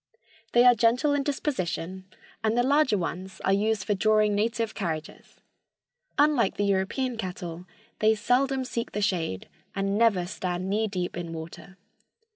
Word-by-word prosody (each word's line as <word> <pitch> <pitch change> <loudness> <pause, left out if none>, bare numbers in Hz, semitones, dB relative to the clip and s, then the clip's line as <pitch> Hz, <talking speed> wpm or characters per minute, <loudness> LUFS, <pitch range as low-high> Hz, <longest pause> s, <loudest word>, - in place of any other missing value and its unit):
They 240 +1 +6
are 250 - +9
gentle 240 +6 +2
in 285 - +1
disposition 190 - -3 0.4
and 220 +1 +1
the 245 - +4
larger 275 -4 +3
ones 185 +1 -5
are 195 - +3
used 210 0 +1
for 205 - 0
drawing 215 +1 +3
native 225 +2 0
carriages. 160 -6 -5 0.8
Unlike 290 -8 +3
the 205 - +1
European 200 +6 0
cattle, 180 -3 -6 0.3
they 220 +1 +4
seldom 260 +4 +1
seek 235 -2 -4
the 210 - -2
shade, 165 - -1 0.3
and 195 +1 0
never 210 -6 +3
stand 180 -1 -3
knee 220 +2 +1
deep 180 -3 -3
in 170 -1 -5
water. 170 +4 -9
205 Hz, 150 wpm, -27 LUFS, 185-235 Hz, 0.8 s, are